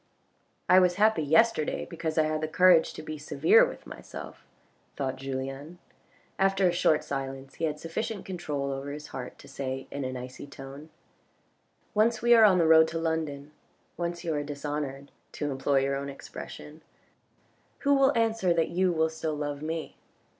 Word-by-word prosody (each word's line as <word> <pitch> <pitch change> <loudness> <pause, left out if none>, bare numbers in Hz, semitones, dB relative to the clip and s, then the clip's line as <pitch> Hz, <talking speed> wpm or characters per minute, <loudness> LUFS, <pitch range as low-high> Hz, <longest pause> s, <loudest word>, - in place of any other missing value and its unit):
" - - -43
I 185 - +7
was 180 -1 +3
happy 215 -2 +3
yesterday, 160 +2 +2
because 165 -2 -4
I 155 - +5
had 155 0 -1
the 155 - -1
courage 180 +1 +5
to 155 - -8
be 155 -1 -6
severe 425 - +4
with - - -4
myself," - - -10 0.5
thought 135 -2 -2
Julien. 135 +4 -5 0.6
After 195 -1 +3
a - - +3
short 165 -3 +2
silence 135 -1 -5
he - - -2
had 150 -1 -3
sufficient 190 +6 -4
control 150 -7 -3
over 135 +1 -5
his 150 +1 -8
heart 125 -1 -7
to - - -15
say 135 -1 -5
in 140 - -4
an 130 0 -4
icy 125 +3 -8
tone, 140 +2 -10 1.0
"Once 220 +1 +3
we 240 0 +5
are 225 -2 +8
on 190 -3 +5
the 170 - +3
road 160 0 +7
to 165 +1 -4
London, 155 -3 -2 0.4
once 170 0 -4
you 165 -2 -1
are 145 - -1
dishonoured, 145 -1 -5 0.2
to 145 -1 -3
employ 135 +1 +1
your 135 0 0
own 140 +1 -4
expression, 150 +2 -10 1.0
who 285 0 +3
will 270 -3 +4
answer 225 -6 +2
that 165 -1 +1
you 180 +1 +1
will 160 -1 +2
still 160 -1 -4
love 145 -1 -4
me 160 +1 -4
155 Hz, 175 wpm, -28 LUFS, 140-175 Hz, 1.0 s, are